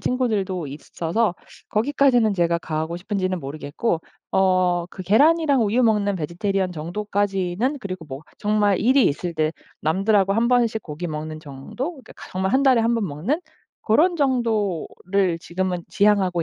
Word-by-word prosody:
친구들도 200 - -1
있어서 170 +7 -2 0.4
거기까지는 245 -2 +3
제가 170 -2 +1
가고 160 +1 -3
싶은지는 185 -1 -2
모르겠고 150 +6 -3 0.3
어 185 -1 +3 0.2
그 185 - -8
계란이랑 285 - +4
우유 225 +5 +2
먹는 210 -3 +2
베지테리언 185 +3 -1
정도까지는 195 - -1
그리고 185 -5 -6
뭐 135 -1 -7 0.2
정말 210 -2 +2
일이 260 +3 +4
있을 170 +4 -2
때 155 0 0 0.3
남들하고 195 +4 +2
1 230 +3 +2
번씩 235 -3 +2
고기 160 +3 -6
먹는 155 0 -5
정도? 145 - -6
그러니까 275 -6 -14 0.2
정말 190 +2 -1
1 265 +1 +3
달에 260 -4 +5
1 230 +1 +2
번 225 -4 0
먹는 175 - -2 0.4
고런 330 +11 +3
정도를 205 - 0
지금은 180 0 -3
지향하고 195 -4 +2
195 Hz, 330 characters per minute, -23 LUFS, 170-230 Hz, 0.4 s, 달에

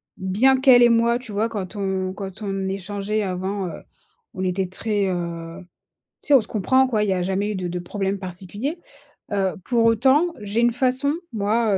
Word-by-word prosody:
Bien 210 +8 +3
qu'elle 260 -2 +7
et 240 - +7
moi, 235 +1 +3
tu 250 -3 -10
vois? 215 +3 0
Quand 200 -3 -5
on 190 -2 -2
quand 195 +1 -8
on 195 -2 -2
échangeait 200 +2 -2
avant, 190 0 -2
heu, - - -7 0.5
on 185 -3 -4
était 185 +1 0
très, 205 +2 -1
heu 170 -1 -4 0.6
tu - - -13
sais, 290 - +6
on 270 - +8
se 215 - -10
comprend, 260 +6 +3
quoi. 225 -5 0
Il 205 - 0
y - - +2
a 185 - 0
jamais 195 +3 -1
eu - - -3
de 185 -2 -3
de 175 +1 -3
problèmes 195 +2 -3
particuliers. 195 - -5 0.5
Heu, 195 -2 0
pour 235 +1 +2
autant, 265 +8 +4
j'ai 205 +2 -2
une 240 0 +3
façon, 260 +3 +1 0.2
moi, 215 -1 +1
205 Hz, 200 wpm, -23 LUFS, 190-235 Hz, 0.6 s, on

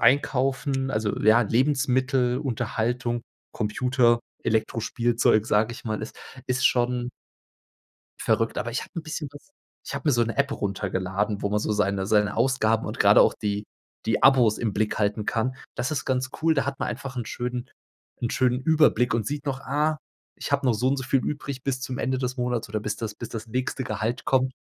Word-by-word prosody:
einkaufen 135 0 +2
also, 110 -3 -1
ja, 110 +3 +6
Lebensmittel, 130 +1 +2
Unterhaltung, 120 -2 -1 0.3
Computer, 120 +2 +2 0.2
Elektrospielzeug, 115 0 +1
sage 110 +3 +2
ich 120 - -10
mal, 110 -2 -2
ist, 110 - -7 0.3
ist 125 0 +2
schon 125 0 +1 1.1
Verrückt. 115 0 +1
Aber 120 -1 -2
ich 125 - -1
habe - - -10
'n 170 - -2
bisschen 155 -2 -5
was 145 - -14 0.4
Ich - - -6
habe 160 - -3
mir - - +5
so 120 0 +3
'ne 115 - -3
App 140 0 +2
runtergeladen, 100 -1 -2
wo 100 - +1
man 105 0 +1
so 105 - -1
seine 100 -1 0
seine 105 -1 +2
Ausgaben 115 -3 +2
und - - -6
gerade - - +7
auch - - +4
die 105 0 -3 0.4
die 110 -1 +1
Abos 125 -5 +6
im 110 -4 -1
Blick 105 +1 0
halten 105 +1 0
kann. 125 +4 0 0.2
Das 125 - -2
ist 150 - -2
ganz 130 0 0
cool. 160 0 +4
Da 140 -2 0
hat 140 -1 -3
man - - -1
einfach 135 -1 -5
'n 120 - -2
schönen 125 +1 -4 0.5
'n 120 - 0
schönen 125 0 +1
Überblick 140 -6 +3
und 110 -3 0
sieht 145 0 -4
noch, 135 -1 -2
ah, 150 +3 0 0.4
ich - - -6
habe - - +1
noch 125 - +4
so 120 +4 0
und 140 +1 +2
so 130 - -3
viel 135 +1 +2
übrig 140 -2 -4
bis 130 -2 -1
zum 130 -1 -4
Ende 130 +1 0
des 125 0 -2
Monats 125 -2 -1
oder 110 0 -1
bis 105 0 -3
das 110 -2 -4
bis - - -7
das 115 0 -6
nächste 130 +2 -2
Gehalt 115 -1 -3
kommt. 130 0 +2
125 Hz, 195 wpm, -25 LUFS, 110-130 Hz, 1.1 s, gerade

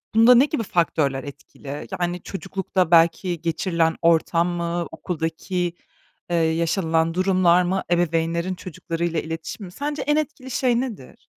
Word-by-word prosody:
bunda 235 +2 +7
ne 260 +4 +6
gibi 290 -6 -2
faktörler 155 -7 0
etkili? 140 0 -9
Yani, 175 0 -2
çocuklukta 190 -2 -2
belki 170 +1 +3
geçirilen 165 -1 0
ortam 170 +1 +3
mı, 170 -1 -2
okuldaki, 170 +2 -3 0.6
eee, 175 - 0
yaşanılan 165 0 +1
durumlar 185 -1 +3
mı, 190 +2 -1
ebeveynlerin 170 +1 +1
çocuklarıyla 170 -2 -3
iletişimi 165 +5 -6
mi? 175 - -10
Sence 290 +6 -4
en 295 +1 +1
etkili 270 -4 -3
şey 245 -1 +2
nedir? 220 - -8
175 Hz, 130 wpm, -23 LUFS, 165-190 Hz, 0.6 s, bunda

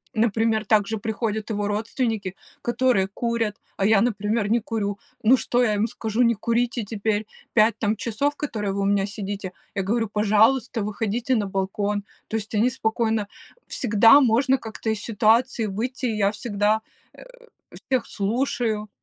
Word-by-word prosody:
Например, 220 0 +1
также 215 +1 +2
приходят 220 0 -3
его 205 -1 -1
родственники, 215 -2 -2 0.3
которые 240 -5 +2
курят, 230 -1 -2 0.2
а 195 - +1
я, 210 -2 +5
например, 210 -2 0
не 235 +1 +3
курю. 205 -3 -3 0.2
Ну, 250 +4 +5
что 245 +2 0
я 215 -4 +2
им 205 +2 +1
скажу? 230 0 -1
Не 235 0 +4
курите 235 +2 -1
теперь 210 0 -2 0.3
5 220 0 +4
там 215 0 0
часов, 265 +7 -1
которые 215 -10 -3
вы 200 - -2
у - - 0
меня 200 -1 +2
сидите. 200 -2 -5 0.2
Я 195 - 0
говорю: 225 +2 0
"Пожалуйста, 220 +3 +2
выходите 225 +4 -1
на 210 -2 0
балкон". 200 +2 -2 0.2
То 225 - -2
есть 215 0 -5
они 240 +4 +3
спокойно 220 -2 -1 0.4
всегда 225 +3 +5
можно 260 +2 +3
как-то 225 -1 -6
из 220 -1 0
ситуации 225 +2 +2
выйти, 250 +6 -3
и 220 -2 -2
я 200 0 +2
всегда, 215 -1 0 0.3
э, - - -13 0.7
всех 255 -2 +1
слушаю. 220 0 -1
220 Hz, 160 wpm, -24 LUFS, 205-235 Hz, 0.7 s, я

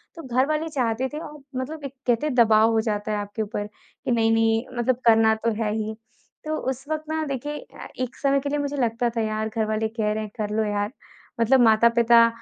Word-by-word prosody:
तो 330 - -9
घरवाले 305 +5 +1
चाहते 255 -3 0
थे 300 - -4
और 300 0 -11 0.2
मतलब 295 +4 -5
एक 275 - -6
कहते 240 +3 +2
हैं 275 - -2
दबाव 225 -1 +5
हो 225 - +2
जाता 210 0 -2
है 210 - 0
आपके 205 +2 -4
ऊपर 205 -1 -3
कि 210 - -9
नहीं, 225 -1 +3
नहीं 225 +1 +2
मतलब 240 +1 +2
करना 220 -1 +5
तो 230 - +3
है 210 - -1
ही। 220 0 -3 0.5
तो 310 0 -1 0.2
उस 265 +2 -8
वक़्त 310 0 -2
ना 315 0 -1
देखिए 290 +1 -4 0.2
अ, - - -7
एक 255 0 -3
समय 275 0 +2
के 285 - -3
लिए 295 - 0
मुझे 285 0 -2
लगता 240 -1 +1
था - - +2
यार 215 0 -1
घरवाले 220 -1 -1
कह 220 -1 -1
रहे 215 - -2
हैं, 210 - -8
कर 210 -2 -2
लो 220 - +2
यार, 205 0 -1 0.5
मतलब 260 +4 +5
माता-पिता 235 +1 +5
230 Hz, 220 wpm, -24 LUFS, 220-270 Hz, 0.5 s, दबाव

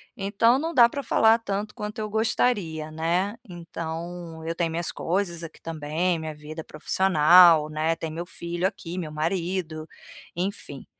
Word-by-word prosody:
então 210 +5 +2
não 325 +4 -3
dá 240 -5 +7
pra 280 +4 -5
falar 225 -2 +4
tanto 210 -1 -4
quanto 210 +2 -6
eu 215 -1 -3
gostaria, 210 -7 0
né. 175 +6 0
Então 170 -1 -7
eu 165 +1 -3
tenho 165 -1 -1
minhas 170 +1 -2
coisas 170 -1 -2
aqui 165 - -10
também, 165 +2 -1
minha 160 -1 -5
vida 150 +2 -8
profissional, 165 -1 +5
né, 155 +2 0
tem 165 0 -5
meu 170 +2 -5
filho 175 0 -4
aqui, 180 -3 -7
meu 165 -4 -4
marido, 165 0 -2 0.5
enfim. 175 -6 -3
170 Hz, 155 wpm, -25 LUFS, 160-195 Hz, 0.5 s, dá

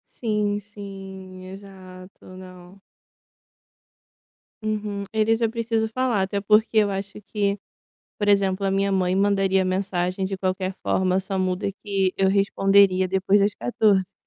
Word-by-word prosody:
Sim 210 -3 -1
sim, 195 -2 -10
exato, 185 -1 -12
não. 185 0 -13 1.8
Uhum, 210 -2 -3
eles 220 +1 +2
eu 225 -1 +1
preciso 225 -1 -1
falar, 235 -3 0
até 200 +1 -2
porque 215 +2 +3
eu 210 -1 +4
acho 200 +1 -5
que, 200 -2 0 0.6
por 205 -1 0
exemplo, 195 -1 +2
a 195 - +1
minha 195 +1 +1
mãe 185 -1 +1
mandaria 195 -1 +2
mensagem 185 0 -1
de 190 0 -3
qualquer 185 0 -2
forma, 185 0 +1
só 190 0 -4
muda 185 +1 -1
que 195 -3 0
eu 190 0 +2
responderia 195 -1 +3
depois 195 +2 +2
das 205 +1 +2
14. 200 -5 +1
195 Hz, 135 wpm, -23 LUFS, 190-205 Hz, 1.8 s, eu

